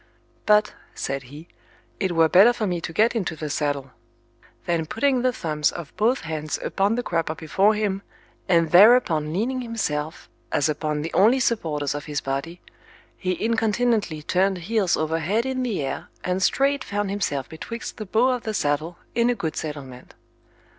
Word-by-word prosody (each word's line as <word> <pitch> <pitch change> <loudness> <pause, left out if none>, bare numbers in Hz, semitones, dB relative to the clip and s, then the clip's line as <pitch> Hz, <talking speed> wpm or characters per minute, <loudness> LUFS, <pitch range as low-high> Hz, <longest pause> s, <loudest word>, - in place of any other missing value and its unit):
But, 210 0 +4 0.2
said 135 0 -3
he, 150 +4 -11 0.5
it 190 -4 0
were 165 -1 +5
better 195 +9 +6
for 225 - -2
me 175 -3 -2
to 165 - -5
get 220 +8 +2
into 185 -7 -2
the 150 -1 -5
saddle; 140 -3 -2 0.7
then 165 -2 0
putting 260 - +1
the 255 0 +2
thumbs 155 -9 -1
of 170 -4 -9
both 240 +5 +2
hands 155 -1 -3
upon 200 +3 +1
the 245 - -2
crupper 165 -4 -1
before 195 +7 +2
him, 200 -2 -1 0.5
and 165 -3 +3
thereupon 180 -6 +6
leaning 245 +9 -1
himself, 160 -10 -3 0.2
as 145 - +2
upon 150 -1 -2
the 165 - -5
only 225 +7 +5
supporters 160 - 0
of 145 0 -5
his 150 -1 -2
body, 140 +6 -4 0.5
he 185 -1 -2
incontinently 225 -7 0
turned 190 +4 +1
heels 190 +1 0
over 160 +1 -1
head 205 - 0
in 260 -1 -2
the 225 - -1
air, 135 - -5 0.2
and 185 +1 -1
straight 275 +6 +2
found 205 -3 -2
himself 145 -10 -2
betwixt 230 +8 -7
the 215 - -6
bow 230 +6 +3
of 250 -2 0
the 220 -1 -4
saddle 155 +3 -1 0.2
in 235 +1 +2
a 245 - +1
good 165 -7 -3
settlement. 140 -5 -7
180 Hz, 175 wpm, -24 LUFS, 155-225 Hz, 0.7 s, better